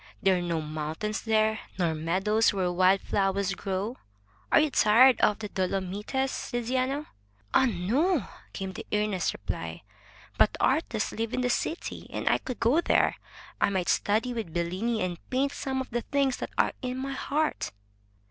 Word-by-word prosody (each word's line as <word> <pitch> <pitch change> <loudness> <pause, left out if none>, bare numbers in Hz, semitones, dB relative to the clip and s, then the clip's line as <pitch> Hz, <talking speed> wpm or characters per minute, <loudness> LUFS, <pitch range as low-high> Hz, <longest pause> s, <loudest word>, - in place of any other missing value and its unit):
There 190 -1 +3
are 180 - -1
no 170 -2 -1
mountains 155 +7 -3
there, 220 -1 +2 0.2
nor 170 -4 +1
meadows 190 +8 +2
where 185 -3 0
wild 185 +2 +4
flowers 195 0 0
grow. 195 +5 -3 0.5
Are - - +7
you 305 -1 +2
tired 240 +4 +6
of 210 - +4
the 215 - -5
Dolomites, 195 +8 -2
Tiziano?" 255 +4 -1 0.5
"Ah, 265 - +5
no!" 245 - +1 0.3
came 190 -1 -5
the - - -8
earnest 210 -3 +1
reply. - - -6 0.6
"But - - +5
the - - -4
artists 230 -9 +1
live 225 +1 -3
in 255 - 0
the 250 0 +1
city, 325 +7 -3
and - - -4
if - - +4
I - - +4
could 255 - -6
go 260 +9 +3
there, - - +2 0.4
I - - +4
might 190 -3 -1
study 225 +4 +1
with 225 -8 -4
Bellini, 185 +7 -1
and 175 -2 -3
paint 270 +2 +1
some 265 -2 -2
of 260 - -8
the 240 0 -1
things 275 0 0
that - - -5
are - - +3
in 255 -1 -3
my 270 +1 -3
heart." 300 +3 -1
215 Hz, 175 wpm, -28 LUFS, 190-255 Hz, 0.6 s, Are